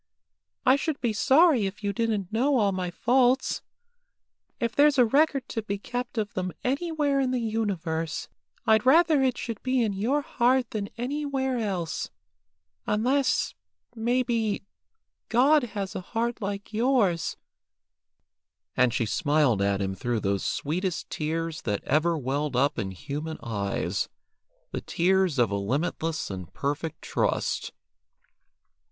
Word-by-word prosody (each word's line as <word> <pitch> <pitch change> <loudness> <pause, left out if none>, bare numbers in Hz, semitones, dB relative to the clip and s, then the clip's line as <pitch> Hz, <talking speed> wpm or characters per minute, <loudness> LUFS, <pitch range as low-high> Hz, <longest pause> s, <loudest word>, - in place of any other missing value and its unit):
I 255 +2 +6
should 305 0 -2
be 235 -3 0
sorry 265 - +4
if 205 +3 -8
you 200 0 0
didn't 215 -4 -1
know 265 +5 +3
all 205 -4 +3
my 185 -2 -2
faults. 250 +6 +2 1.0
If 235 -1 -1
there's 290 0 +5
a 250 - +6
record 275 +2 +2
to 225 - -2
be 200 -1 -3
kept 245 +3 -5
of 210 -2 -1
them 185 -1 -3
anywhere 290 +1 0
in 265 -1 +1
the 255 - 0
universe, 185 -8 -2 0.4
I'd 220 -1 +4
rather 310 +2 +5
it 255 -2 +1
should 230 -4 -5
be 255 -1 +1
in 210 -3 0
your 250 +10 0
heart 250 -1 +2
than 205 -2 -3
anywhere 265 0 -1
else, 185 -7 -2 0.8
unless, 255 +5 +1 0.4
maybe, 235 -2 0 0.7
God 280 +6 +5
has 195 -2 -3
a - - -3
heart 230 +5 -2
like 200 +1 -4
yours;" 215 -8 +1 1.4
and 125 -1 +4
she 115 0 0
smiled 145 -2 +2
at 100 0 +1
him 95 0 -2
through 120 +1 -2
those 100 0 0
sweetest 175 +4 -2
tears 160 +1 -2
that 105 -3 -2
ever 160 +4 +2
well 140 +2 -1
up 140 0 +2
in 95 -4 -2
human 145 - -5
eyes, 100 -4 -2 0.6
the - - -3
tears 185 -2 +1
of 120 -4 +3
a - - 0
limitless 150 - -2
and 95 -3 -7
perfect 145 +3 -3
trust. - - -1
205 Hz, 140 wpm, -27 LUFS, 160-255 Hz, 1.4 s, I